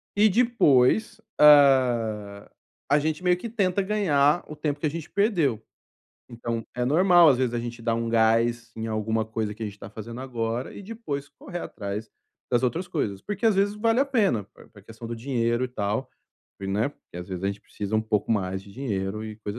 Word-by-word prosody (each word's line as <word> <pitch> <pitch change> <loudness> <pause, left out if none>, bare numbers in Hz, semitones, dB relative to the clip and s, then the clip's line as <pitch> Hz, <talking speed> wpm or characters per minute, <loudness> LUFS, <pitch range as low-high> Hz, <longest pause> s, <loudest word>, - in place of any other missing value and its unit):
e 210 +1 +5
depois, 220 - +3 0.2
hã, 120 -8 +4 0.4
a 145 +2 +4
gente 155 +3 -2
meio 180 -1 +3
que 230 +6 -6
tenta 200 -4 +1
ganhar 175 -7 +2
o 155 - -8
tempo 150 -1 -2
que 155 - -2
a - - +2
gente 160 +1 -7
perdeu. 170 - +1 0.7
Então 115 -1 -4
é 125 - 0
normal, 175 +4 +6
às 135 -4 +4
vezes 125 -2 0
a - - 0
gente 120 0 -6
dar 115 0 +1
um 115 0 -2
gás 115 +1 +2
em 110 0 -4
alguma 110 0 -1
coisa 110 -1 -3
que 110 - -9
a - - -1
gente 100 -1 -9
tá - - -10
fazendo 115 +3 -8
agora 120 -1 -3
e - - -9
depois 185 -10 -5
correr 175 +5 -8
atrás 105 -3 -5 0.4
das 120 0 +2
outras 160 +9 -1
coisas. 110 - -3
Porque 205 - -5
às 220 - +4
vezes 200 +1 +2
vale 225 +3 +2
a - - +4
pena, 210 - +1
pr - - -19
pra 100 - -16
questão 115 +3 -10
do 115 - -4
dinheiro, 120 -1 0
e - - -3
tal, 110 +2 -2 0.5
né. 100 +5 0
Porque 145 - -16
às 90 +1 -7
vezes 95 0 -5
a - - +2
gente 100 0 -3
precisa 105 0 -6
um - - +3
pouco 110 -1 -1
mais 95 -2 -2
de 100 - -15
dinheiro 105 -4 -3
e 110 -1 -7
coisa 105 +1 -6
120 Hz, 210 wpm, -25 LUFS, 110-160 Hz, 0.7 s, normal